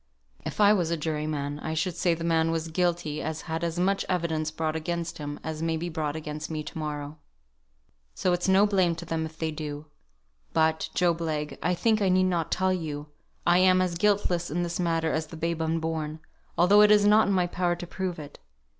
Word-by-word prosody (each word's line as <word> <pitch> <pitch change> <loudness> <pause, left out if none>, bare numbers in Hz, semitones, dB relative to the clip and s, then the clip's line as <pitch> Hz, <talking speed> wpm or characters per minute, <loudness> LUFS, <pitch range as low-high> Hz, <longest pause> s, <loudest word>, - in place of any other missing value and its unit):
If - - -6
I 205 0 +7
was 175 -6 +1
a 170 - 0
jury 155 -1 -2
man, 145 -1 -3
I 160 +1 -4
should 175 +2 -1
say 175 -1 +2
the 165 - -6
man 165 -1 +2
was 165 0 -2
guilty 170 -3 -1
as 160 0 -4
had 160 0 -4
as 170 0 -2
much 195 +2 +1
evidence 160 -4 0
brought 155 0 -2
against 170 +1 -3
him 145 0 -5
as 160 0 -4
may 165 0 0
be 170 +2 -3
brought 155 -3 -2
against 155 0 -5
me 155 -1 -3
to 150 - -9
morrow. 150 0 -5 1.0
So 180 - +1
it's 175 +1 -1
no 190 +2 +6
blame 185 -5 +2
to 170 +1 -8
them 160 -1 -2
if 160 0 -16
they 160 -1 -2
do. 150 -1 -6 0.7
But, 160 0 +2
Job 170 -2 +2
Legh, 150 -3 -2
I 180 - +1
think 220 +3 +2
I 195 - +3
need 185 0 +4
not 175 -3 0
tell 190 0 +2
you 150 -4 -4 0.4
I 175 +1 +5
am 185 0 +5
as 185 -1 +1
guiltless 190 -4 +1
in 175 +3 -1
this 170 0 -3
matter 165 -2 +1
as 155 0 -1
the 165 - -10
babe 165 0 -2
unborn, 160 -1 -2 0.4
although 200 +4 +6
it 210 - +7
is 210 -1 +6
not 210 +1 +5
in 200 - +2
my 180 -1 +3
power 175 0 0
to 175 - -7
prove 185 0 -4
it. 150 -2 -10
165 Hz, 220 wpm, -27 LUFS, 155-180 Hz, 1.0 s, I